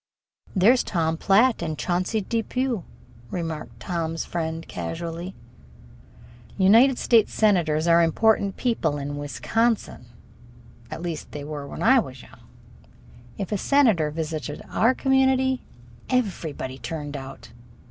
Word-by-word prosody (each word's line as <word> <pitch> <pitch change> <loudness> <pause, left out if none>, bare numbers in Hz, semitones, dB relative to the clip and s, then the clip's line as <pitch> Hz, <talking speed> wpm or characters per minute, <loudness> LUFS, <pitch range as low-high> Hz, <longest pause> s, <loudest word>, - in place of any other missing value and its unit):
"There's 225 +7 +5
Tom 160 -3 0
Platt 215 +8 +3
and 155 -2 -3
Chauncey 180 - -1
Depew," 230 +1 -2 0.4
remarked 165 -3 -5
Tom's 165 -2 -3
friend 165 -1 -4
casually. 165 - -5 1.2
United 230 +7 +5
States 225 -3 +3
senators 170 -7 +2
are 170 0 +6
important 200 +4 +2
people 170 - 0
in 145 0 -4
Wisconsin 215 - -1 0.8
at 165 - -7
least, 170 -3 -5
they 145 - -6
were 145 -1 -6
when - - -6
I 265 0 +6
was 130 - -6
young. - - -17 1.0
If 195 -1 -4
a 205 - 0
senator 225 - +3
visited 155 -1 -5
our 245 +3 +3
community, 265 -1 +2 0.5
everybody 170 - -2
turned 150 -3 -5
out. 135 -1 -9
175 Hz, 115 wpm, -24 LUFS, 155-225 Hz, 1.2 s, are